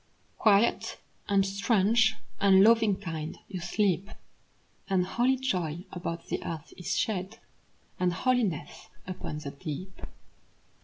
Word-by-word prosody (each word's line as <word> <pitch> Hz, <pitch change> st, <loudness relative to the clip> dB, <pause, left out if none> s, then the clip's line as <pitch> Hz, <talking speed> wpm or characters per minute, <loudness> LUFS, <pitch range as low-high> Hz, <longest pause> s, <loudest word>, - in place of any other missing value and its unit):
Quiet, 210 Hz, 0 st, +3 dB, 0.3 s
and 195 Hz, -1 st, +4 dB
strange, 215 Hz, +2 st, +3 dB, 0.2 s
and 195 Hz, -1 st, +6 dB
loving 225 Hz, -2 st, +5 dB
kind, 160 Hz, -5 st, -5 dB
you 190 Hz, -2 st, -5 dB
sleep. 190 Hz, +2 st, 0 dB, 0.8 s
And 185 Hz, -2 st, +2 dB
holy 245 Hz, +7 st, +2 dB
joy 180 Hz, -, -2 dB
about 170 Hz, -2 st, -5 dB
the -, -, -3 dB
earth 160 Hz, -2 st, -6 dB
is 180 Hz, -, -2 dB
shed; 200 Hz, 0 st, -2 dB, 0.6 s
And 180 Hz, 0 st, +2 dB
holiness 200 Hz, -, -1 dB, 0.2 s
upon 180 Hz, -4 st, -5 dB
the 150 Hz, -2 st, -6 dB
deep. 170 Hz, +5 st, -7 dB
190 Hz, 115 wpm, -29 LUFS, 175-215 Hz, 0.8 s, and